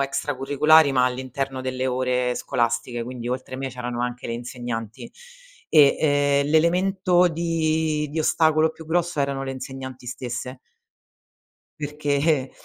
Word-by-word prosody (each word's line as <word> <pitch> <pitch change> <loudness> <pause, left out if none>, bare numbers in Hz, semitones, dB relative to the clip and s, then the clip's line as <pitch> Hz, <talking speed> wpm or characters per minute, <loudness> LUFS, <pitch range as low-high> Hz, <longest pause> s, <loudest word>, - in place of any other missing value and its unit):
extracurricolari, 145 +2 +3
ma 125 -1 +3
all'interno 130 +1 -3
delle 130 0 -2
ore 125 -1 0
scolastiche, 120 0 -1
quindi 120 0 -6
oltre 130 +1 -4
me 135 0 -3
c'erano 125 -1 -5
anche 125 0 -3
le - - -3
insegnanti. 120 -2 -6 0.6
E, 145 -3 +6
ehm, 145 -2 +2
l'elemento 180 +3 +3
di 160 -2 0
di 160 - -4
ostacolo 155 0 +3
più 160 0 -13
grosso 170 -1 0
erano 140 -1 -1
le 135 - -4
insegnanti 130 -1 -8
stesse. 125 +1 -5 1.2
Perché 145 -1 0
135 Hz, 125 wpm, -23 LUFS, 125-155 Hz, 1.2 s, E